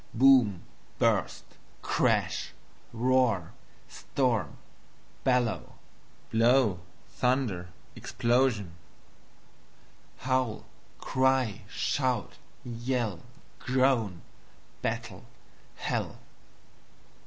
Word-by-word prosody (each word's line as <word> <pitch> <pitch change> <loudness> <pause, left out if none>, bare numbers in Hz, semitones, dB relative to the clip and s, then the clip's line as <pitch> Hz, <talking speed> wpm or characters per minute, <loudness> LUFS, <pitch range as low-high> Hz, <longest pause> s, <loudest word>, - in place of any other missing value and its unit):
Boom, 125 -7 +5 0.3
burst, - - +1 0.4
crash, - - 0 0.4
roar, 120 -7 +1 0.3
storm, 125 -8 -1 0.7
bellow, 125 -3 0 0.6
blow, 115 -4 +4 0.3
thunder, 120 -9 0 0.3
explosion; 120 -7 +1 1.4
howl, 130 -3 -1 0.3
cry, 130 -5 +1
shout, 130 -4 -1 0.3
yell, 120 -5 -2 0.4
groan; 125 -8 +1 0.6
battle, - - -4 0.5
hell. - - -3
120 Hz, 55 wpm, -29 LUFS, 110-130 Hz, 1.4 s, Boom